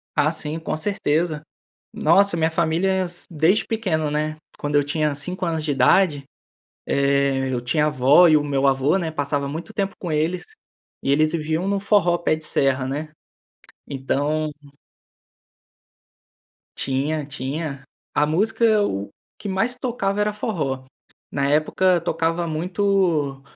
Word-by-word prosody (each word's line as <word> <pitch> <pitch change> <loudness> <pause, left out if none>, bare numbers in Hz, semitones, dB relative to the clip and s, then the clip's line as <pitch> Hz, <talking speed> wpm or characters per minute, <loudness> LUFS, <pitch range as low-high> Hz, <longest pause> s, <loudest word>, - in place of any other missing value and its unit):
Ah, 150 0 +3
sim, 155 0 -3
com 160 - -3
certeza. 155 -3 0 0.5
Nossa, 175 +2 +3
minha 160 0 +1
família 165 +3 +1
é 190 0 +1
assim 175 -1 -5
desde 165 +7 +2
pequeno, 170 -10 -1
né, 155 +1 -2 0.2
quando 145 0 -2
eu 145 - +4
tinha 150 +1 0
5 180 +7 -4
anos 160 -2 -1
de 150 - -1
idade, 145 +3 +3 0.6
eh, 140 -1 +1
eu 120 - -1
tinha 150 +5 +1
avó 150 +4 +5
e 155 - +5
o 150 - 0
meu 140 -1 +1
avô, 135 +6 +2
né, 165 -4 -2
passava 145 -2 -2
muito 165 +9 -6
tempo 195 -2 -2
com 175 - -4
eles, 160 +4 -1 0.6
e 135 - +1
eles 155 +2 +3
viviam 160 +3 -1
no 200 0 0
forró 195 -4 +3
pé 170 - +1
de 155 - -9
serra 135 -3 +1
né. 150 +4 -4 0.8
Então 145 +3 -1 2.3
Tinha 145 +3 -1
tinha 140 +1 -5 0.3
a 145 - +4
música 215 +6 +2
o 100 - -3 0.3
que - - -6
mais 225 +6 0
tocava 210 -5 -1
era 210 0 0
forró. 150 - -3 0.5
Na 140 -1 0
época 170 +5 +2
tocava 165 +1 -1
muito, 170 -4 0
155 Hz, 145 wpm, -22 LUFS, 145-180 Hz, 2.3 s, avó